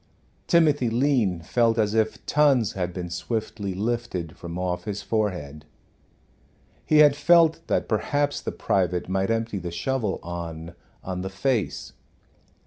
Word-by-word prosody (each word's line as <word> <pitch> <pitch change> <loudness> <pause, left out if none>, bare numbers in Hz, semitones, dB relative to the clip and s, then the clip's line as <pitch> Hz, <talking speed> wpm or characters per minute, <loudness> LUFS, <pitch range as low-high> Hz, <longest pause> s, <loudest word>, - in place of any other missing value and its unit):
Timothy 150 -8 +3
Lean 115 -8 +1
felt 115 +5 +2
as 105 -2 +1
if 110 -1 0
tons 140 -8 +3
had 90 -2 -2
been 90 -1 -6
swiftly 100 +2 -3
lifted 105 -6 -3
from 85 0 -7
off 90 -1 -2
his 105 -1 -4
forehead. 90 -10 -2 1.2
He 155 - +3
had 150 -2 +7
felt 165 +2 +4
that - - 0
perhaps 145 +6 0
the - - -4
private 90 -2 0
might 95 +2 0
empty 115 -2 -1
the 90 -1 -5
shovel 105 +4 -2
on 85 -1 -6 0.3
on 90 -1 -4
the 95 - -4
face. 110 +2 -2
105 Hz, 135 wpm, -25 LUFS, 90-125 Hz, 1.2 s, had